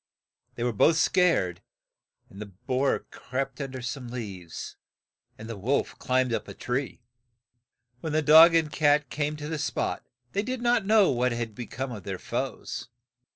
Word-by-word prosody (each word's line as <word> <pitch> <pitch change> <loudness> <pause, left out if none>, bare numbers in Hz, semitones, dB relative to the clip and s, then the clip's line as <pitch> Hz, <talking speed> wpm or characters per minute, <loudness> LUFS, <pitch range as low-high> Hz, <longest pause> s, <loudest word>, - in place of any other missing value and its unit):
They 120 - -3
were 120 -1 0
both 155 +10 +4
scared, 165 - +2 0.7
and 100 - -12
the 105 - -6
boar 125 +8 -1
crept 135 +1 -4
un 135 - -3
der 130 -1 -7
some 125 +1 -5
leaves, 95 -9 -7 0.6
and 110 - -9
the 115 - -5
wolf 120 +8 -1
climbed 130 -1 +1
up - - -2
a - - -9
tree. 125 0 -3 1.0
When 160 - -4
the 155 +1 +1
dog 160 +3 +8
and 160 -2 +2
the - - -7
cat 145 -1 +3
came 150 0 -1
to 150 0 -6
the 160 -1 -3
spot, 145 - -2 0.3
they 200 - 0
did 255 +3 -3
not 240 -4 +2
know 215 -5 +5
what 125 -1 +1
had 115 -2 -4
be 120 +3 -7
come 130 +1 -5
of 110 -4 -6
their 95 0 -5
foes. - - -4
130 Hz, 180 wpm, -27 LUFS, 115-155 Hz, 1.0 s, dog